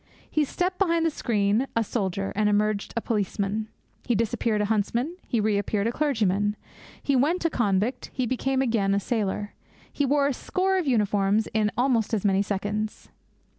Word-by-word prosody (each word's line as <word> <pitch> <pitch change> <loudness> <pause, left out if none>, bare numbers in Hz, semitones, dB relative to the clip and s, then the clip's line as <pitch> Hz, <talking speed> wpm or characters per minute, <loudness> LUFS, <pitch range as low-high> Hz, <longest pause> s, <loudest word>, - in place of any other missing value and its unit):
He 305 -1 +2
stepped 365 +5 -2
behind 335 -4 +2
the 325 - +2
screen 215 -1 +1
a 230 - +3
soldier, 195 -3 -2
and 210 0 +2
emerged 210 0 +1
a - - +1
policeman. 210 -1 -1 0.4
He 240 - +1
disappeared 220 0 0
a 210 - +1
huntsman, 230 - 0
he 235 - 0
reappeared 205 -1 0
a 230 - +1
clergyman. 210 -8 +1 0.5
He 280 - +2
went 315 +7 +2
a 330 - +2
convict, 215 +1 0
he 255 - -1
came 265 +1 0
again 210 -5 +1
a - - +2
sailor. 205 -1 -2 0.4
He 285 - 0
wore 285 +1 +3
a 280 - +1
score 380 +8 0
of 340 - -3
uniforms 210 -3 +2
in 215 -1 +2
almost 240 -3 +2
as 210 - -3
many 195 -1 +3
seconds. 205 +1 -3
220 Hz, 170 wpm, -26 LUFS, 205-265 Hz, 0.5 s, a